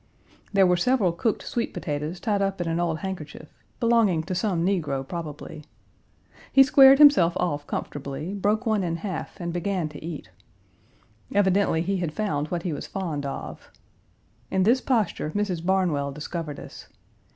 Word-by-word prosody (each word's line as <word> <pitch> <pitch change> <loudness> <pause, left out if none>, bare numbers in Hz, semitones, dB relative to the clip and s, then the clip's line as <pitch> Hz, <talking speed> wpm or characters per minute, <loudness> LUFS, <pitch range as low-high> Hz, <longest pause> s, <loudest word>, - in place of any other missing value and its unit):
There 195 -1 +5
were 180 -1 +3
several 215 -2 +2
cooked 205 +6 -1
sweet 235 - -3
potatoes 150 +3 -4
tied 205 -3 0
up 195 -1 -1
in 175 - -2
an 165 +1 -1
old 170 -2 0
handkerchief 185 -6 -7 0.3
belonging 230 -9 +3
to 185 +3 -4
some 180 -2 0
negro 150 -8 -1
probably. 155 -2 -7 0.9
He 270 - +8
squared 270 0 +7
himself 230 - +6
off 145 -5 -2
comfortably, 145 +5 -5
broke 210 +4 0
one 215 -3 +1
in 170 -2 -1
half 180 0 -6
and 170 -1 -4
began 175 -2 -1
to 150 0 -11
eat. 155 - -7 1.0
Evidently 190 -4 +3
he 195 +2 -1
had 170 -4 -3
found 155 -9 -1
what 170 +1 -3
he 175 - -2
was - - -6
fond 160 -7 -3
of. 135 - -7 0.8
In 190 -1 +1
this 240 +6 +3
posture 220 - 0
Mrs. 190 -5 -1
Barnwell 175 -7 +1
discovered 150 +1 -5
us. - - -11
180 Hz, 160 wpm, -25 LUFS, 160-200 Hz, 1.0 s, He